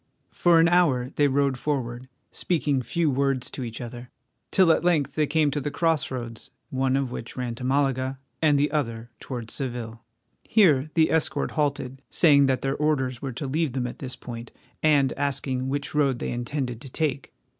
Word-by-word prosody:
For 170 -1 +4
an 165 - +6
hour 150 -8 +3
they 145 - +4
rode 135 -1 +1
forward, 125 -4 -3 0.2
speaking 150 -6 0
few 155 +5 0
words 135 -1 0
to 130 - -5
each 115 -2 -6
other, 120 0 -8 0.4
till 185 -3 +5
at - - +2
length 150 -6 +2
they 155 -1 +1
came 155 -2 +2
to 145 - -1
the 145 - -2
cross 165 -1 0
roads, 120 -3 -6 0.2
one 130 0 +1
of 135 -3 -1
which 115 - -7
ran 125 -2 -2
to 120 - -8
Malaga, 130 0 0 0.2
and 150 -3 +4
the 145 +1 +1
other 120 -6 -2
towards 120 -4 -6
Seville. 120 -4 -4 0.4
Here 155 - +4
the 160 -1 +4
escort 160 -1 +1
halted, 140 -3 -2
saying 140 -5 +5
that 130 -2 0
their 135 0 0
orders 135 -5 0
were 135 -2 -4
to 140 - -5
leave 150 0 -1
them 130 -2 -1
at 125 - -6
this 130 -2 -6
point, 115 -1 -8 0.3
and 145 -4 +3
asking 135 -2 -2
which 140 +1 -3
road 140 -4 +2
they - - -3
intended 120 -1 -3
to 135 - -9
take. 140 -1 -2
135 Hz, 190 wpm, -25 LUFS, 125-150 Hz, 0.4 s, an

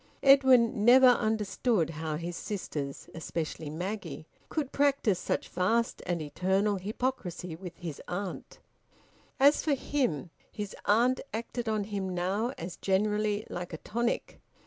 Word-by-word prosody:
Edwin 260 -6 +6
never 255 +3 +8
understood 220 -5 +1
how 155 -1 -3
his 170 +2 -4
sisters, 150 -10 -5
especially 160 -1 -4
Maggie, 190 +8 -5 0.2
could 295 -4 -2
practise 275 -9 +2
such - - -2
vast 225 +6 0
and 175 -3 -1
eternal 190 +7 +1
hypocrisy 185 -4 -3
with 180 0 -9
his 165 -5 -6
aunt. 185 +1 -5 0.8
As 285 +2 +6
for 295 -3 +2
him, 245 - -1 0.2
his 205 -2 -5
aunt 240 +5 +3
acted 235 +1 -3
on 215 -1 0
him 195 -3 -3
now, 195 +7 0
as 170 +1 -6
generally, 210 +2 +1
like 175 0 -6
a - - -3
tonic. 235 +7 -2
205 Hz, 130 wpm, -30 LUFS, 175-235 Hz, 0.8 s, never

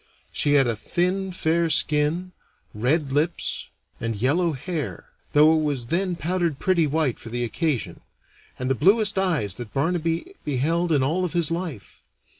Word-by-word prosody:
She 145 - +1
had 140 -2 +5
a 120 -2 0
thin, 180 - -1
fair 170 -1 +1
skin, 155 +4 +1 0.4
red 135 +6 0
lips, 155 +5 -1 0.3
and 115 -1 -2
yellow 160 - +2
hair 145 - -5 0.2
though 150 +2 +6
it 160 - +2
was 145 -5 -1
then 180 +2 0
powdered 170 -2 -1
pretty 170 -3 +2
white 150 -4 0
for 115 - -9
the 120 +1 -2
occasion 140 - -2 0.6
and 130 - -3
the 135 - +3
bluest 200 - +3
eyes 155 - 0
that 120 0 -8
Barnaby 165 - -1
beheld 165 +5 0
in 145 -4 +3
all 165 +7 0
of 180 - -2
his 170 -3 +1
life. 165 - -5
155 Hz, 160 wpm, -24 LUFS, 135-175 Hz, 0.6 s, though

